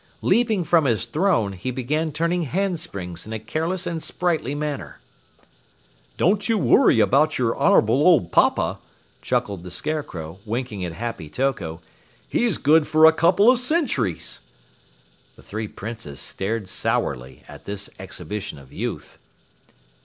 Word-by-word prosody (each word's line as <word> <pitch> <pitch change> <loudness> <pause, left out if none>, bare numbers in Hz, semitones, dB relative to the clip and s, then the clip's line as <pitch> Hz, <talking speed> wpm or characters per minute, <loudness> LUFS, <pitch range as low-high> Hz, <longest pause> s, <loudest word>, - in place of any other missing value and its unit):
Leaping 225 -6 +2
from 165 -1 +3
his 115 -3 +1
throne, 150 - +1
he 95 +7 -5
began 145 +6 -1
turning 170 +4 0
handsprings 155 - -3
in 110 - -6
a 110 - -3
careless 165 - -2
and 170 -2 -3
sprightly 160 -7 -1
manner. 150 -1 -4 1.2
"Don't 200 +6 +2
you 225 - +3
worry 225 - +4
about 145 +7 +3
your 120 -3 +1
honorable 115 +6 +4
old 155 - +4
papa," - - +2 0.4
chuckled 100 -4 -1
the 90 - -8
Scarecrow, 90 - -5
winking 115 -3 -4
at 85 -2 -4
Happy 115 -6 -5
Toko. 95 - -2 0.5
"He's 230 -8 +1
good 155 +1 +4
for 155 0 +5
a 160 - +8
couple 185 +8 +5
of 255 - +1
centuries!" 250 - -1 0.9
The - - -18
three 110 +1 -5
Princes 105 -10 -8
stared 105 +1 -3
sourly 65 -7 -2
at - - -13
this 100 0 -4
exhibition 105 -6 -6
of 70 -2 -15
youth. - - -5
135 Hz, 140 wpm, -23 LUFS, 100-170 Hz, 1.2 s, a